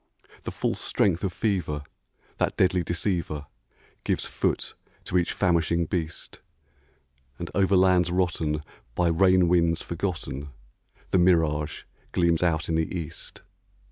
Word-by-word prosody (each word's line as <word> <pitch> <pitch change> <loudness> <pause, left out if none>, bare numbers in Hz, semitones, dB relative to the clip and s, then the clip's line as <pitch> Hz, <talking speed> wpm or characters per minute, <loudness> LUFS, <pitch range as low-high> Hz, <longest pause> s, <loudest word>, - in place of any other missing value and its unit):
The - - -5
false - - -2
strength 90 -4 +1
of 95 - 0
fever, 90 -8 -1 0.5
that - - 0
deadly 90 -1 +3
deceiver, 85 -3 -2 0.6
Gives - - 0
foot - - -1 0.3
to - - -4
each 90 -1 +2
famishing 85 -2 +1
beast; 80 -1 -4 1.0
And 85 - -6
over 100 0 +3
lands 90 -1 +4
rotten, 85 -4 0 0.3
by 90 -1 +2
rain 90 +1 +4
winds 85 -1 +2
forgotten, 85 -6 -4 0.6
The 95 - +3
mirage 80 -4 +2 0.3
gleams 85 -2 +2
out 80 -3 +1
in 80 - -1
the 80 0 0
east. 85 -2 -6
85 Hz, 125 wpm, -26 LUFS, 80-90 Hz, 1.0 s, lands